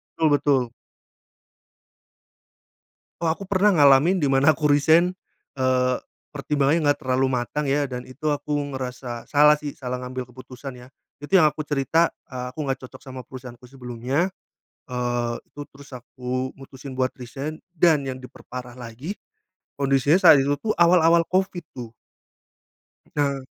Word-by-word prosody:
Betul 160 - +2
betul. 140 -4 +2 2.5
Wah, 165 -1 +2
aku 195 +3 -11
pernah 200 +1 +4
ngalamin 150 +4 +5
di 145 - +2
mana 135 +3 +4
aku 150 0 0
resign, 160 +5 +4 0.5
eee, 130 -1 +2 0.3
pertimbangannya 145 +2 0
nggak 145 - +2
terlalu 130 +1 +1
matang, 125 +4 -2
ya, 140 0 0
dan 125 -1 -6
itu 150 +4 -4
aku 150 0 -2 0.2
ngerasa 125 -2 -6
salah, 150 +1 +5
sih, 145 -1 -6
salah 125 -1 -5
ngambil 125 0 -6
keputusan, 130 +1 -10
ya. 125 0 -13 0.3
Itu 145 +6 -11
yang 155 - +6
aku 150 +1 -6
cerita, 150 +3 +1 0.2
eee, 125 -1 -5
aku 155 - -5
nggak 135 - 0
cocok - - -14
sama 130 -2 -9
perusahaanku 125 -2 -11
sebelumnya, 125 +6 -2 0.6
eee, 120 -1 -1 0.2
itu 145 - -8
terus 140 -1 -15
aku 125 +1 -4
mutusin 135 -1 -10
buat 130 0 0
resign 135 +5 -7 0.2
dan 160 -3 +4
yang 130 - -5
diperparah 125 -1 -10
lagi 125 - -7 0.6
kondisinya 140 +3 +3
saat 160 -5 +8
itu, 140 +1 +1
tuh, 215 - 0
awal-awal 170 -1 +5
covid, 185 -1 0
tuh. 120 -2 -7 1.3
Nah, 140 -2 +1
135 Hz, 145 wpm, -23 LUFS, 125-150 Hz, 2.5 s, saat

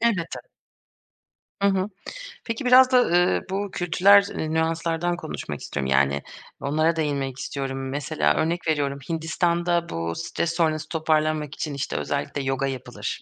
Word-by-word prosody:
Elbette. 210 -8 0 1.2
Hı 200 - +4
hı. 195 0 +1 0.6
Peki, 230 +3 -4
biraz 255 +1 +7
da, 255 - +6
ııı, 175 -4 +3
bu 200 +1 -2
kültürel 190 +4 +5 0.2
nüanslardan 165 +2 0
konuşmak - - -6
istiyorum. 70 0 -3
Yani, 70 +1 +3 0.4
onlara 155 +4 +1
değinmek 140 -4 -2
istiyorum. 135 -1 -4
Mesela, 75 - 0
örnek 170 +2 -1
veriyorum 140 -3 0
Hindistan'da 170 +1 0
bu 85 0 -3
stres 85 - -2
sonrası 155 -3 0
toparlanmak 155 -2 0
için, 150 - -4
işte, 140 0 -3
özellikle 140 0 -2
yoga 135 0 0
yapılır. 130 -2 -5
160 Hz, 130 wpm, -24 LUFS, 140-175 Hz, 1.2 s, biraz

